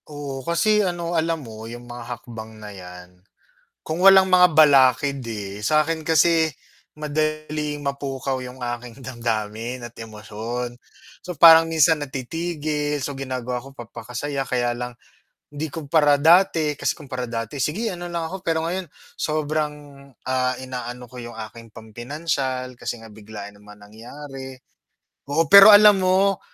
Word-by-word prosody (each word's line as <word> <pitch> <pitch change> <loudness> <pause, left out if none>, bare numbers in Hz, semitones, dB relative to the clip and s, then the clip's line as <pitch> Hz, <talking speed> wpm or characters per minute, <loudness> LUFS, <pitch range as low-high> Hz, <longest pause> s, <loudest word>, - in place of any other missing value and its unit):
Oo, 145 -2 -6
kasi 210 - +2
ano 175 -3 -2
alam 165 -3 -1
mo 110 0 -9
yung 120 +1 -9
mga 120 0 -9 0.2
hakbang 110 -2 -10
na 105 -1 -10
yan, 90 -1 -12 0.6
kung 165 +4 -3
walang 190 -1 +8
mga 180 -2 +5
balakid, 140 -3 +4
eh, 105 -2 -6
sa'kin 155 +4 +1
kasi, 160 0 +3 0.5
madaling 155 0 -2
mapukaw 140 -1 -3
yung 125 +1 -10
aking 120 +1 -6
damdamin 115 -1 -4
at 120 0 -10
emosyon, 115 +2 -6 0.5
so 180 - -5
parang 165 0 +8
minsan 160 0 +4
natitigil, 150 +1 -3
so 140 +1 -4
ginagawa 125 -2 -4
ko 135 - -12
papaka-saya, 125 +3 -5
kaya 120 -2 -1
lang, 125 0 -5 0.6
hindi 145 0 -6
kumpara 150 -2 +2
dati, 165 -3 +4
kasi - - 0
kumpara 130 -5 -7
dati 115 +2 -5
sige 205 - -2
ano 175 -3 -6
lang 170 -2 -4
ako 190 +1 -8
pero 160 -1 0
ngayon, 185 +1 -3 0.3
sobrang, 155 0 -1 0.6
ah, 130 0 +1
inaano 125 -1 -7
ko 125 - -12
yung 120 -1 -8 0.2
aking 115 -1 -15
pam-pinansiyal 130 +2 -4
kasi 120 -1 -5
nga 115 - -12
biglaan 105 -1 -10
naman 105 0 -16
nangyari, 130 +6 -10 0.8
oo 155 +4 +2
pero 200 +1 +11
alam 205 -1 +7
mo, 190 +1 +2
135 Hz, 140 wpm, -22 LUFS, 120-160 Hz, 0.8 s, pero